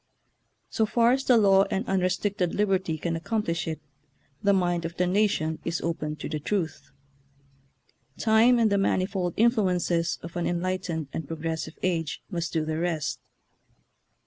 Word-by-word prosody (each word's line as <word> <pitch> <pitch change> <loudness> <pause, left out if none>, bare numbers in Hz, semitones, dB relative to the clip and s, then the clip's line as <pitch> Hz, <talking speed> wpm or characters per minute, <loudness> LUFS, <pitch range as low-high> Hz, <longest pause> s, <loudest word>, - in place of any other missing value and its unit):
So 220 - +1
far 235 +2 +3
as 265 +1 0
the 250 - +5
law 195 -2 +5
and 205 +6 -2
un 195 0 +1
restricted 185 0 0
liberty 190 -5 +1
can 165 +2 -2
accomplish 170 -1 -2
it, 160 -1 -3 0.6
the 200 - +3
mind 175 -3 +1
of 165 +1 -5
the 180 - +2
nation 180 -5 +1
is 170 0 -2
open 155 -2 -2
to - - -6
the 155 - -3
truth. 165 0 -3 1.3
Time 230 +2 +4
and 225 -3 +3
the 200 - +3
manifold 185 -2 0
influences 185 -7 +2
of 170 +1 -8
an 175 - -1
enlightened 175 -3 -2
and 160 - -4
progressive 160 0 -4
age 165 -4 -1
must 170 -2 -2
do 160 -1 0
the 155 0 -2
rest. 165 -4 -2
180 Hz, 155 wpm, -26 LUFS, 165-200 Hz, 1.3 s, the